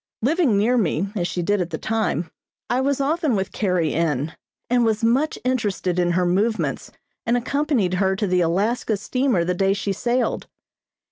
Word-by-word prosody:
Living 285 - +3
near 240 +5 +3
me, 190 -1 0
as 175 -4 0
she 175 - -3
did 205 +2 +1
at 175 - -2
the 160 - -4
time, 215 -7 -1 0.4
I 250 +2 +2
was 280 0 0
often 300 -1 +1
with 190 -1 -2
Carrie 180 -7 0
N. 155 -2 -1 0.3
and 245 0 +2
was 225 0 0
much 265 +7 +2
interested 205 -8 -1
in 175 -1 +2
her 180 +1 +2
movements 205 +6 0 0.3
and 235 +1 +1
accompanied 250 - 0
her 190 +1 +1
to 205 - -1
the 180 -2 +2
Alaska 205 +6 0
steamer 255 -2 0
the 180 - 0
day 195 +2 +2
she 200 0 -2
sailed. 240 +5 -1
205 Hz, 180 wpm, -22 LUFS, 180-245 Hz, 0.4 s, Living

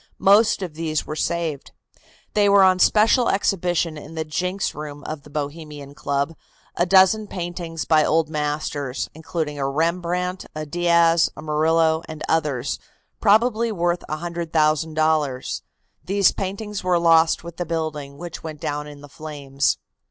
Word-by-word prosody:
Most 205 +1 +4
of 175 -4 -5
these 155 -1 -2
were 155 - -5
saved. 160 -3 -2 0.6
There 205 -1 +4
were 200 -1 +7
on 185 -1 +4
special 225 +5 +4
exhibition 175 -5 0
in 155 +2 -11
the 160 0 -2
"Jinks" 180 +5 -2
room 150 -1 -8
of 155 -1 -6
the 150 - -16
Bohemian 145 -1 -6
Club 140 +3 -2 0.4
a 175 - +1
dozen 190 +3 +5
paintings 175 -3 -5
by 155 -1 +4
old 160 0 +2
masters, 150 -3 -3
including 155 -2 -4
a 135 0 0
Rembrandt, 175 +4 -1
a 155 0 -4
Diaz, 170 +1 +3
a - - -8
Murillo 160 +1 +2
and 155 -1 -7
others, 145 -5 0 0.4
probably 225 +2 +3
worth 175 -3 0
$100,000. 155 -3 0 0.4
These 195 0 +3
paintings 200 +1 -4
were 180 -1 +2
lost 165 -1 +4
with 170 -1 -9
the 175 - -2
building, 155 -4 -4
which 175 0 -7
went 155 -2 -7
down 150 +1 -3
in 145 -1 -11
the 145 - -11
flames. 140 -2 -2
160 Hz, 145 wpm, -22 LUFS, 150-180 Hz, 0.6 s, were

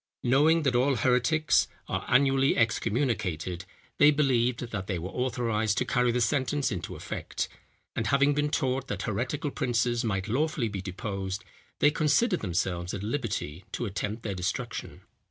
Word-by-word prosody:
Knowing 150 +6 +4
that 135 -3 +2
all 130 +3 +3
heretics 130 +6 +3 0.2
are - - -3
annually 135 +1 +3
excommunicated, 105 - 0 0.3
they 145 - +8
believed 125 -5 +2
that 95 -3 -4
they 95 - -1
were 90 +3 -5
authorized 115 -4 0
to - - +1
carry 125 -1 +2
the 125 - 0
sentence 135 +4 +1
into 90 -4 -4
effect; - - -4 0.5
and 110 - -1
having 140 +2 +4
been 145 +1 +1
taught 135 -2 0
that - - -3
heretical 125 +7 -2
princes 120 -3 0
might 100 -3 -1
lawfully 135 0 0
be 100 -2 -4
deposed, 95 0 -4 0.3
they 145 - +4
considered 165 +7 +2
themselves 90 -1 -2
at 100 - -5
liberty 105 - -3
to 120 - -3
attempt 105 +2 -3
their 100 - -2
destruction. 90 0 -4
120 Hz, 155 wpm, -28 LUFS, 100-140 Hz, 0.5 s, they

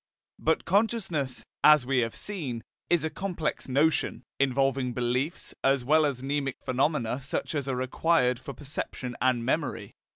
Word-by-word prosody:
But 160 +1 +1
consciousness, 190 - 0 0.2
as 150 -4 +7
we 130 0 +2
have 115 -2 -1
seen, 140 - -4 0.3
is 175 -3 +3
a 160 - -1
complex 175 -8 -3
notion, 145 +4 +2 0.2
involving 135 -1 +1
beliefs, 125 +6 -1
as 135 -2 +3
well 155 +2 +5
as 130 -3 -4
mnemic 140 -1 -1
phenomena 130 -1 0
such 135 +4 -2
as 145 -3 -2
are 135 - 0
required 130 0 +2
for 130 +2 -8
perception 135 -3 -5
and 125 -2 +2
memory. 145 +2 -1
135 Hz, 150 wpm, -28 LUFS, 125-155 Hz, 0.3 s, as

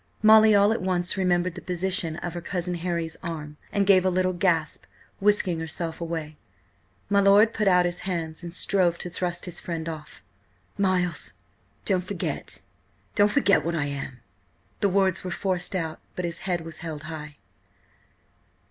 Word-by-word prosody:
Molly 215 0 +8
all 200 +1 +5
at 225 - -3
once 180 -1 0
remembered 180 -2 +1
the 175 - -8
position 180 -2 0
of 170 0 -5
her 175 - -5
"Cousin 180 0 -2
Harry's" 170 -2 -3
arm, 150 -4 -6
and 200 -1 +1
gave 190 -2 +6
a 190 - +3
little 185 0 +1
gasp, 175 -4 0 0.3
whisking 195 -4 +2
herself 165 +1 -4
away. 160 -2 -4 0.7
My 200 0 +3
lord 200 +3 +6
put 210 -2 0
out 180 -1 +5
his 175 0 -2
hands 165 -4 -4
and 170 -1 -7
strove 180 -1 +1
to 180 - -7
thrust 175 0 -2
his 180 -1 -5
friend 165 -2 -4
off. 155 -2 -8 0.5
"Miles, 185 -3 0 0.5
don't 185 -3 +1
forget–don't 200 +2 -3
forget–what 200 - +3
I 150 -3 0
am!" 140 -3 -5 0.6
The 200 - +2
words 190 -1 +2
were 185 - -4
forced 185 0 -2
out, 160 -3 -3 0.2
but 180 - -2
his 170 -1 -3
head 175 -2 0
was 165 0 -8
held 155 -3 -6
high. 155 -2 -8
175 Hz, 160 wpm, -26 LUFS, 165-190 Hz, 0.7 s, Molly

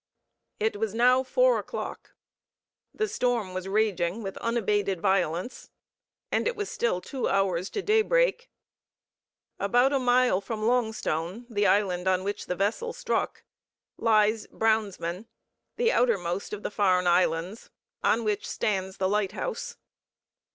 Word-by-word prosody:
It 215 0 0
was 220 0 -2
now 250 +2 +5
four - - +3
o'clock; - - -7 0.8
the 430 - -1
storm 245 - -1
was 185 0 -4
raging 200 -1 0
with 195 -1 -5
unabated 205 -5 0
violence, 185 +2 -1 0.6
and - - +1
it 480 - -1
was 415 -1 -4
still 205 -7 0
two 265 +5 -3
hours 190 -2 +1
to 410 - -4
daybreak. 475 +3 +2 1.1
About 245 +7 +3
a 275 - +2
mile 250 -5 +3
from 215 +1 -5
Longstone, 220 -4 -1
the 205 -2 +2
island 190 -3 +1
on 185 0 +2
which 205 +1 -4
the 180 - -1
vessel 220 - -1
struck, - - -2 0.5
lies 215 -1 +2
Brownsman, 210 -3 -1 0.5
the 470 0 +2
outermost 195 -6 0
of 210 0 -6
the - - -3
Farne 185 -3 +2
Islands, 175 +3 +1 0.3
on 230 - +2
which 210 -1 -2
stands 190 -2 -2
the 190 - +1
lighthouse. 210 - -2
210 Hz, 130 wpm, -27 LUFS, 190-245 Hz, 1.1 s, now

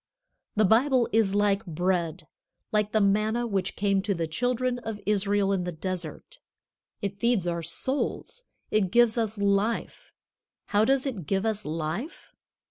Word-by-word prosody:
The 215 0 +4
Bible 245 +4 +4
is 210 -3 +3
like 205 0 +2
bread, 175 -1 -1 0.5
like 210 -1 +1
the 220 - +2
manna 215 +4 +2
which 195 -4 -2
came 195 -1 +1
to 200 0 -1
the 165 -1 -1
children 245 +8 -1
of 225 -3 -6
Israel 200 -1 +1
in 185 -2 0
the 180 - -3
desert. 180 - -6 0.6
It 200 0 -3
feeds 235 -5 +2
our 170 -1 -1
souls. 280 - -2 0.3
It 205 -3 +2
gives 240 +2 +4
us 225 -2 -1
life. 200 +3 -1 0.6
How 210 +1 +3
does 270 +2 +2
it 210 - -4
give 195 +1 0
us 215 -2 -1
life? 165 - -5
205 Hz, 150 wpm, -27 LUFS, 185-230 Hz, 0.6 s, The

